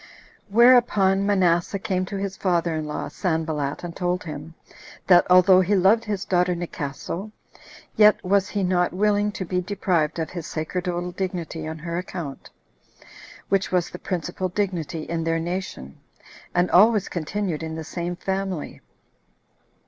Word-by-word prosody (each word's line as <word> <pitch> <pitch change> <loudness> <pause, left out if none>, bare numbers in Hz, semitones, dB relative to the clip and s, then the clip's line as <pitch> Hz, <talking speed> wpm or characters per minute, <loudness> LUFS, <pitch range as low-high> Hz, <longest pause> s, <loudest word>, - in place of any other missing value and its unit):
Whereupon 210 -4 +5
Manasseh 180 -2 +2
came 185 -1 -1
to 200 - -4
his 195 0 -3
father 175 -3 0
in 155 -1 -3
law, 150 - -4
Sanballat, 160 -5 -2
and 170 -1 -6
told 180 -1 -1
him, 155 0 -8 0.5
that 175 -2 +5
although 185 +1 +7
he 195 +3 +2
loved 200 +5 +4
his 205 -3 -3
daughter 180 -1 +2
Nicaso, 170 +4 -5 0.6
yet 210 0 +6
was 195 +1 +2
he 200 -2 -1
not 180 -1 +1
willing 205 +2 +2
to 200 -4 -4
be 180 +1 -1
deprived 180 -5 0
of 160 -1 -3
his 170 -3 -6
sacerdotal 175 +2 -3
dignity 175 -4 -4
on 160 0 -5
her 170 +2 -4
account, 170 -6 -7 1.0
which 195 -1 +1
was 180 -2 0
the 180 - -8
principal 180 +1 -3
dignity 175 -5 -2
in 165 0 -3
their 165 0 0
nation, 175 - -5 0.6
and 175 0 +2
always 210 +2 +5
continued 175 0 -3
in 160 0 -5
the 160 - -5
same 175 +2 -4
family. 190 -2 -4
180 Hz, 150 wpm, -24 LUFS, 165-195 Hz, 1.0 s, although